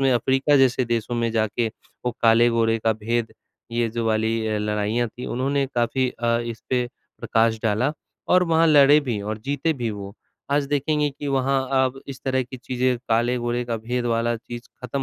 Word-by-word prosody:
में 135 -1 +3
अफ्रीका 135 +4 +2
जैसे 130 -1 +3
देशों 120 0 -2
में 115 -1 0
जाके 110 +1 0 0.4
वो 125 - +1
काले-गोरे 115 0 +4
का 110 0 +1
भेद, 115 +2 -2 0.4
ये 115 0 0
जो 115 +1 -3
वाली 110 0 0
अ, 110 -1 0
लड़ाइयाँ 105 +3 -1
थीं 125 +3 -9
उन्होंने 135 +2 0
काफ़ी 125 +2 +1
अ, 115 -1 0
इस 115 -1 -6
पे 125 -1 +1 0.3
प्रकाश 115 0 +2
डाला 115 +6 +1 0.4
और 180 0 +5
वहाँ 165 -1 +3
लड़े 145 -1 +7
भी 120 -8 -3
और 105 +2 -4
जीते 145 +4 0
भी 120 -6 -3
वो। 100 -1 -7 0.4
आज 145 0 +2
देखेंगे 145 +1 +1
कि 145 +1 -8
वहाँ, 135 0 +1 0.2
अब 130 +1 -3
इस 135 -1 -8
तरह 130 -1 +1
की 130 +1 -9
चीज़ें, 125 0 -1
काले-गोरे 120 +1 0
का 120 -1 -2
भेद 120 +2 -3
वाला 115 0 +1
चीज़, 120 +1 -9
खत्म 130 +2 -3
120 Hz, 185 wpm, -23 LUFS, 115-135 Hz, 0.4 s, लड़े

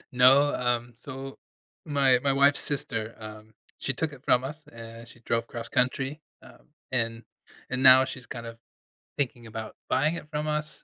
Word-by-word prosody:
No, 135 +3 +6
um, 120 -1 -1
so 135 +2 -9 0.5
my 135 -4 +3
my 140 - +3
wife's 140 +1 +5
sister, 115 -6 -1
um, 110 0 -10 0.3
she 135 - -1
took 155 -2 -2
it 130 - -13
from 125 +1 +3
us, 150 +3 -7
uh, 115 0 -11
she 120 0 -17
drove 115 0 -1
cross 120 -1 -7
country, 135 +4 0 0.2
um, - - -17 0.2
and 115 -2 -1 0.5
and 130 0 -1
now 130 0 +8
she's 130 -2 -8
kind 115 -1 -7
of 115 0 -9 0.6
thinking 120 -4 -3
about, 110 0 -7 0.2
buying 155 +4 +2
it 150 - -9
from 150 0 -3
us, 150 0 -3
130 Hz, 170 wpm, -27 LUFS, 115-140 Hz, 0.6 s, now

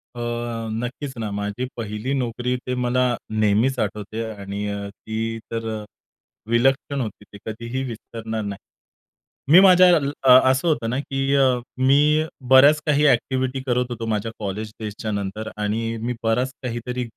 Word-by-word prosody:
अ, - - -7 0.5
नक्कीच 125 +5 -4
ना, 110 -2 -3
माझी 105 +4 -3
पहिली 110 +3 -3
नोकरी, 125 -1 -1
ती 125 0 -5
मला 125 0 +1 0.3
नेहमीच 110 +4 +2
आठवते 105 +2 -3
आणि 100 0 -5 0.2
ती 110 +2 -4
तर 115 0 -3
अ, - - -9 0.7
विलक्षण 135 +3 +2
होती, 110 -3 -6
ती - - -9
कधीही 115 +4 -4
विसरणार 115 -2 -5
नाही. 100 -1 -5 0.9
मी 180 - +11
माझ्या 185 -1 +7
अ, 140 -2 +1 0.2
असं 130 +6 0
होतं 145 -8 +1
ना, 125 +3 -1
की 135 0 -1 0.5
मी 150 +3 +4 0.2
बऱ्याच 140 +3 +7
काही 150 0 +3
ॲक्टिव्हिटी 130 +1 +1
करत 125 0 +1
होतो 115 -2 -5
माझ्या 110 0 -2
कॉलेज 105 +1 -4
डेजच्या 110 0 -5
नंतर 100 +1 -4
आणि 110 +2 -1
माझा 115 +2 -2
बराच 125 +3 +1
काहीतरी 125 +1 -3
120 Hz, 145 wpm, -22 LUFS, 110-130 Hz, 0.9 s, मी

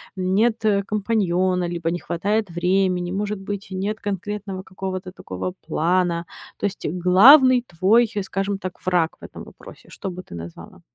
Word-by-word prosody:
нет 205 +5 +1 0.3
компаньона, 185 -4 0
либо 170 -1 -2
не 175 - -2
хватает 205 +5 -1
времени, 180 +1 0
может 205 +1 -2
быть, 200 0 -5
нет 200 +3 -3
конкретного 200 -1 -4
какого-то 185 -1 -6
такого 95 - -6
плана. 175 0 +1 0.3
То - - -3
есть 200 0 -4
главный 240 - +6
твой, 205 +7 +3
скажем 195 +1 -2
так, 185 -2 -6
враг 175 -3 +1
в - - -20
этом - - -9
вопросе, - - -14
что 195 - -6
бы 180 +1 -8
ты - - -11
назвала? 85 0 -10
185 Hz, 150 wpm, -22 LUFS, 180-205 Hz, 0.3 s, главный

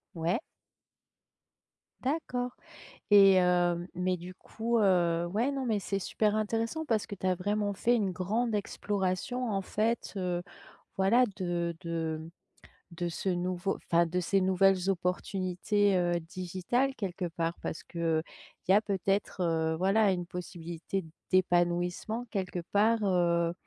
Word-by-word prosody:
Ouais. 170 +6 0 1.6
D'accord 255 -3 -2 0.6
et 200 -1 +8
hem, 175 -1 +2
mais 180 +1 0
du 180 +1 -9
coup, 230 +5 -2
heu, 175 -4 +3
ouais, 220 +9 0
non, 270 -2 -2
mais 220 -3 +1
c'est 195 0 -2
super 210 +2 0
intéressant 225 +8 -1
parce 225 -6 +1
que - - -6
tu 185 - -5
as 185 - +3
vraiment 205 +2 -1
fait 240 +5 +2
une 205 -5 +1
grande 215 +6 -1
exploration 205 +4 -2
en 195 -2 0
fait, 220 +5 -1
heu, 180 -2 -1 0.5
voilà 200 +7 +4
de 175 -2 -2
de, 165 -2 -2
hem, 160 +1 -9 0.6
de 175 +1 -3
ce 170 +3 -3
nouveau 180 +1 -1
enfin, 170 0 +3
de 180 +2 -1
ces 195 +3 +2
nouvelles 190 0 +3
opportunités, 185 +2 0
heu, 175 -1 +1
digitales, 185 +10 -1
quelque 185 -3 -3
part, 165 0 -2
parce - - -4
qu'il 165 -2 0 0.5
y - - +6
a 205 - +6
peut-être, 195 -1 -1
heu, 160 -1 +1
voilà, 195 +3 +3
une 175 -1 -3
possibilité 175 +1 -5 0.3
d'épanouissement, 175 +5 +1
quelque 185 -2 -2
part, 220 +3 +4
heu, 170 -3 +2
185 Hz, 140 wpm, -30 LUFS, 175-205 Hz, 1.6 s, et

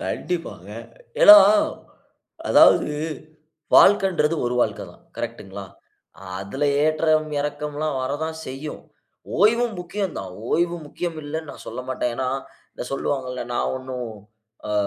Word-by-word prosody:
கண்டிப்பாங்க. 165 - -4 0.5
ஏன்னா, 210 0 +12 1.1
அதாவது - - +6 0.9
வாழ்க்கைங்கறது 190 -6 +5
ஒரு 120 - -1
வாழ்க்கை - - -1
தான். - - -22
கரெக்ட்டுங்களா? 100 +1 -6 0.8
அதுல 100 +9 -3 0.2
ஏற்றம் 155 0 +2
இறக்கம்லாம் 150 0 -3
வர 130 - -2
தான் 160 0 -5
செய்யும். 135 +4 -7 0.6
ஓய்வும் 225 +3 +3
முக்கியம் 185 +1 -4
தான். 95 -2 -7 0.2
ஓய்வு 175 +1 +1
முக்கியம் 170 +2 -5
இல்லன்னு 155 0 -5
நான் - - -12
சொல்லமாட்டேன். 125 -1 -3
ஏன்னா? 130 0 -1 0.5
இதை - - -6
சொல்லுவாங்கல்ல 130 -2 -3
நான் 120 - -1
ஒன்னும், 130 -2 -6 0.6
அ - - -1
150 Hz, 115 wpm, -23 LUFS, 130-170 Hz, 1.1 s, ஏன்னா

